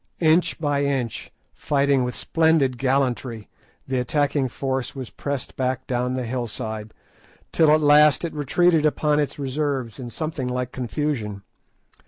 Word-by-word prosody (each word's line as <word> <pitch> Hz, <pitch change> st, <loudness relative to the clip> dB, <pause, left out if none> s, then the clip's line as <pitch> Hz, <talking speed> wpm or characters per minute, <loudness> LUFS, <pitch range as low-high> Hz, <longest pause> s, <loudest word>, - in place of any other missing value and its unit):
Inch 165 Hz, +2 st, +3 dB
by 145 Hz, -2 st, 0 dB
inch, 135 Hz, -5 st, -2 dB, 0.2 s
fighting 140 Hz, -2 st, +1 dB
with 125 Hz, 0 st, -3 dB
splendid 160 Hz, -6 st, +2 dB
gallantry, 130 Hz, -4 st, 0 dB, 0.4 s
the 130 Hz, -1 st, 0 dB
attacking 140 Hz, +2 st, +1 dB
force 135 Hz, +2 st, -3 dB
was 130 Hz, -3 st, -7 dB
pressed 140 Hz, -3 st, -5 dB
back 130 Hz, 0 st, -1 dB
down 125 Hz, 0 st, -1 dB
the 130 Hz, -1 st, -2 dB
hillside, 110 Hz, -3 st, -4 dB, 0.6 s
till 160 Hz, -2 st, +4 dB
at 155 Hz, +1 st, +5 dB
last 150 Hz, +2 st, +5 dB
it 165 Hz, -, -5 dB
retreated 155 Hz, +3 st, +2 dB
upon 150 Hz, 0 st, +2 dB
its 145 Hz, -, -1 dB
reserves 135 Hz, -3 st, -2 dB
in 125 Hz, -2 st, -6 dB
something 155 Hz, -1 st, -4 dB
like 125 Hz, 0 st, -2 dB
confusion. 120 Hz, -6 st, -3 dB
135 Hz, 140 wpm, -23 LUFS, 125-150 Hz, 0.6 s, at